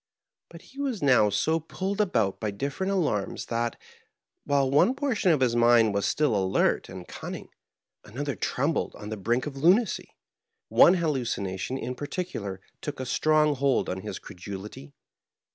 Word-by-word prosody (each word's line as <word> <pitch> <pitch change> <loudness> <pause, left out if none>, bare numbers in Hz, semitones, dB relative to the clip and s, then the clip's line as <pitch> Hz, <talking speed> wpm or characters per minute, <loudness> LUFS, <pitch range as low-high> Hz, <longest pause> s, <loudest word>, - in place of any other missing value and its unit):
But 170 0 -13
he 275 - -15
was 260 - -2
now 125 -6 +5
so 160 +10 +1
pulled 190 +6 -3
about 115 - 0
by 110 - -2
different 140 - -3
alarms 155 - -1
that, 115 0 -1 0.7
while 140 -1 +2
one 145 - +3
portion 255 -10 +1
of 150 -4 +2
his 120 -2 +2
mind 120 -2 +5
was 100 0 0
still 150 -7 +1
alert 95 -1 +1
and 90 -1 -9
cunning, - - -7 0.5
another 140 +6 -4
trembled 145 +5 -1
on 105 - -8
the 110 - -3
brink 120 +6 0
of 145 -2 -6
lunacy. 185 - +2 0.5
One 180 - +7
hallucination 125 - -2
in 125 0 -4
particular 130 - -5 0.2
took 145 -2 -5
a 130 - -3
strong 155 +3 +3
hold 140 -1 +1
on 95 0 -3
his - - -5
cre - - -11
dulity. 95 -6 -9
135 Hz, 160 wpm, -27 LUFS, 105-160 Hz, 0.7 s, One